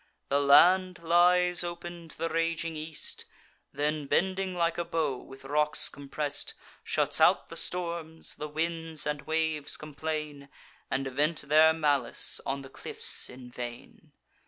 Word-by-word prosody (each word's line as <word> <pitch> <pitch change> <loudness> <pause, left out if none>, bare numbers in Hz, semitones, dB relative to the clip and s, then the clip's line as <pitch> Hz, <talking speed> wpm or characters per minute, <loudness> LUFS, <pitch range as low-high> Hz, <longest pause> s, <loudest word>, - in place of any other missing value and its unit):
The 140 - +3
land 180 +6 +6
lies 175 +1 +4
open 175 -1 -7
to - - -9
the 165 +1 -2
raging 165 0 -1
east, 155 0 -4 0.5
Then, 150 0 -2
bending 190 +3 0
like 170 -1 0
a - - +1
bow, 155 -6 -1
with 135 +1 -13
rocks 150 +2 +3
compress'd, 145 +1 -4 0.3
Shuts - - 0
out - - +4
the - - -8
storms; 170 -2 -3
the 150 - -6
winds 160 0 -2
and 150 -1 -2
waves 160 -2 0
complain, 150 -1 -5 0.4
And 135 +1 -1
vent 150 +4 +1
their 155 +3 +5
malice 145 -6 +1
on 140 0 -2
the 135 - -11
cliffs - - -2
in 125 -1 -11
vain. 120 -1 -9
155 Hz, 140 wpm, -29 LUFS, 145-170 Hz, 0.5 s, land